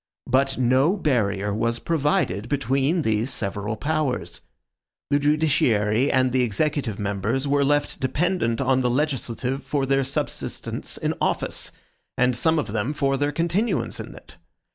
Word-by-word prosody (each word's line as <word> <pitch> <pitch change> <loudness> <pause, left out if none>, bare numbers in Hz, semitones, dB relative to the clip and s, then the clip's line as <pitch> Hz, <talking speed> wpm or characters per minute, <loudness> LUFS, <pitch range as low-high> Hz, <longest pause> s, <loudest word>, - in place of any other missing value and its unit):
BUT 135 +2 +1
NO 130 +9 +3
BARRIER 105 - 0
WAS 115 +2 0
PROVIDED 140 - 0
BETWEEN 140 +4 +1
THESE 110 +2 0
SEVERAL 105 -1 -3
POWERS. 145 +1 -2 0.7
The 145 - +4
judiciary 140 -6 +2
and 130 -1 +2
the 130 0 +2
executive 125 0 0
members 105 +6 -1
were 140 0 +2
left 145 +1 +1
dependent 130 -3 0
on 130 -1 +2
the 125 -1 +1
legislative 130 -1 -1
for 140 -2 -1
their 135 0 +2
subsistence 135 +1 -3
in - - -1
office, - - -1 0.5
and 125 0 +3
some 160 +7 +3
of 150 - -2
them 120 +7 -1
for 135 -2 +1
their 145 +2 0
continuance 170 +5 -1
in - - -8
it. 85 - -15
135 Hz, 140 wpm, -24 LUFS, 115-145 Hz, 0.7 s, The